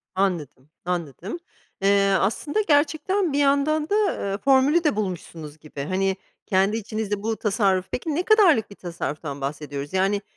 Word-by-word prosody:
Anladım, 155 -8 -2 0.2
anladım. 180 - -4 0.4
Eee, 195 0 +3
aslında 290 - 0
gerçekten 315 +4 +2
bir 285 - +1
yandan 290 +2 +2
da, 410 - +2 0.4
eee, 195 - -2
formülü 275 +6 +3
de 300 -9 +2
bulmuşsunuz 165 -6 -5
gibi. 150 -2 -9
Hani, 190 +3 0 0.3
kendi 195 +2 +2
içinizde 210 -1 -4
bu 225 0 -1
tasarruf 195 -3 +1
Peki 295 +3 -3
ne 350 - 0
kadarlık 360 - +4
bir 200 - -12
tasarruftan 155 -4 -5
bahsediyoruz? 145 +1 -5
Yani, 195 +2 +1
200 Hz, 145 wpm, -24 LUFS, 175-285 Hz, 0.4 s, kadarlık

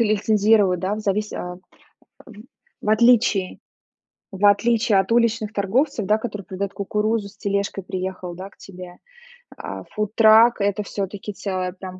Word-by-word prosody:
лицензируют, 210 -3 +2
да, 190 +3 -1
в 215 - -6
завис 210 +1 -2
а, 180 0 -6 1.2
в - - -3
отличие 220 -4 +3 0.7
в 195 +1 -1
отличие 220 +1 +3
от 195 - -2
уличных 230 -2 +1
торговцев, 220 +4 0
да, 210 +2 +3
которые 210 -4 -6
придают 195 +1 -5
кукурузу, 210 +1 -1
с - - -21
тележкой 200 -1 -2
приехал, 185 -1 -5
да, 190 +2 -8
к - - -27
тебе. 180 -2 -11 0.6
А - - -7
фудтрак- 220 +2 +4
это 200 0 0
все-таки 200 +1 -5
целое 185 -2 -4
прям 185 -1 -10
205 Hz, 140 wpm, -22 LUFS, 190-220 Hz, 1.2 s, фудтрак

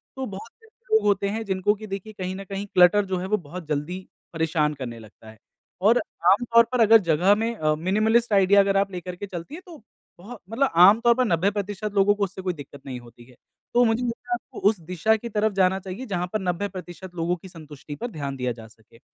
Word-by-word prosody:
तो 265 0 -4
बहुत 205 +1 -9
से - - -20 0.3
लोग 440 - +5
होते 200 -1 +2
हैं 220 +2 -3
जिनको 190 +1 +1
कि 215 +1 -10
देखिए 200 +2 -6
कहीं 185 0 -4
न 195 - -7
कहीं 195 +1 -5
क्लटर 185 +3 +5
जो 190 -1 -2
है 180 - -4
वो 210 +2 +1
बहुत 175 +1 -9
जल्दी 155 +5 -3 0.3
परेशान 160 -2 0
करने 120 -4 -7
लगता 110 0 -15
है 110 - -15 0.5
और 235 +2 +5 0.3
आम 210 +5 +3
तौर 235 0 +8
पर 250 - 0
अगर 225 0 +8
जगह 175 +6 +4
में 230 +2 -2
अ, 155 -6 +1
मिनिमलिस्ट 215 +7 +1
आईडिया 200 +1 +5
अगर 195 0 +3
आप 195 0 +1
लेकर 180 0 -6
के 190 - -6
चलती 180 - -7
है 360 - -9
तो 340 -3 -12 0.4
बहु 220 +7 -10
मतलब 265 +4 +1
आम 195 +6 +7
तौर 240 0 +5
पर 255 +1 +2
90 180 -1 +2
प्रतिशत 205 0 -4
लोगों 200 +1 +4
को 205 - -1
उससे 190 0 -4
कोई 185 -1 -2
दिक्कत 145 -2 -12
नहीं 130 -2 -6
होती 120 0 -16
है। 125 0 -19 0.4
तो 245 0 +5
मुझे 225 +2 +1
लगता 240 0 -5
है - - +3
आपको 240 - -6
उस 210 -3 -2
दिशा 180 +6 +1
की 235 +2 -6
तरफ 215 0 +1
जाना 190 0 +2
चाहिए 195 +6 -7
जहाँ 180 -6 -2
पर 215 - 0
90% 180 -1 -5
लोगों 170 +1 0
की 185 +2 -13
संतुष्टि 150 -3 -10
पर 240 - -5
ध्यान 140 -4 -5
दिया 125 -1 -1
जा 115 -1 -10
सके 110 +1 -22
190 Hz, 240 wpm, -24 LUFS, 165-215 Hz, 0.5 s, तौर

